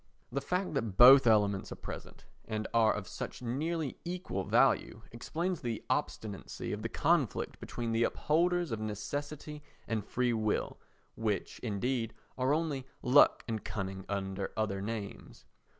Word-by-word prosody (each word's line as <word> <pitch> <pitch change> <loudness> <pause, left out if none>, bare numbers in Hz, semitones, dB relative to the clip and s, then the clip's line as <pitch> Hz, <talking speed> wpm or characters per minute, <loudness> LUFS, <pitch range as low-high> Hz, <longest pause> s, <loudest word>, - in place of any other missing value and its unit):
The 140 +3 -1
fact 180 +6 -1
that 115 -9 -2
both 130 +1 +10
elements 100 -3 +3
are - - -4
present - - -9 0.2
and 110 -1 -3
are 115 -2 +5
of 100 -3 -4
such - - -6
nearly 150 +4 -2
equal 175 - -3
value 110 - +2
explains 170 +9 -3
the 115 -3 -3
obstinacy 105 -2 -3
of 105 - -4
the 115 - -3
conflict 150 - +1
between 120 -1 -4
the 115 +1 +2
upholders 175 +1 +1
of 110 - -2
Necessity 145 +8 -5 0.3
and 110 -2 -1
Free 125 +3 0
Will 110 -2 -1 0.3
which, 105 -4 -2
indeed, 115 +1 -2 0.2
are 130 +1 +1
only 150 -4 -1 0.2
luck 135 +4 +6
and 110 -2 -3
cunning 95 -1 -4
under 95 -1 -3
other 100 -3 -1
names. 105 -1 -6
115 Hz, 145 wpm, -32 LUFS, 105-145 Hz, 0.3 s, both